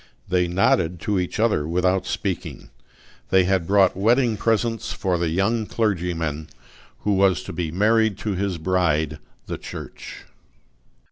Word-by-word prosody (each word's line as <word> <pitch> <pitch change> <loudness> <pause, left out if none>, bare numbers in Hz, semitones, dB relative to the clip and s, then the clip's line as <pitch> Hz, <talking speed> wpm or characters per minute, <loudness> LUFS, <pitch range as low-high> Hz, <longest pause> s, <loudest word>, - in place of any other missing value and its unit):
They 90 -1 +2
nodded 85 -1 +1
to 105 -2 0
each 90 +3 -3
other 110 -10 +2
without 90 +2 +1
speaking: 90 - -4 0.6
they 95 -1 +5
had 90 -2 0
brought 100 -2 +4
wedding 115 +4 +2
presents 115 +1 0
for 90 -3 -1
the 85 -1 0
young 105 +6 0
clergyman, 85 -8 -1 0.5
who 105 - +1
was 95 -3 +3
to - - -7
be 85 -3 -3
married 110 +3 +2
to 105 - 0
his 95 -1 -2
bride 80 -3 0 0.3
the - - -5
Church. - - -9
95 Hz, 140 wpm, -23 LUFS, 85-105 Hz, 0.6 s, they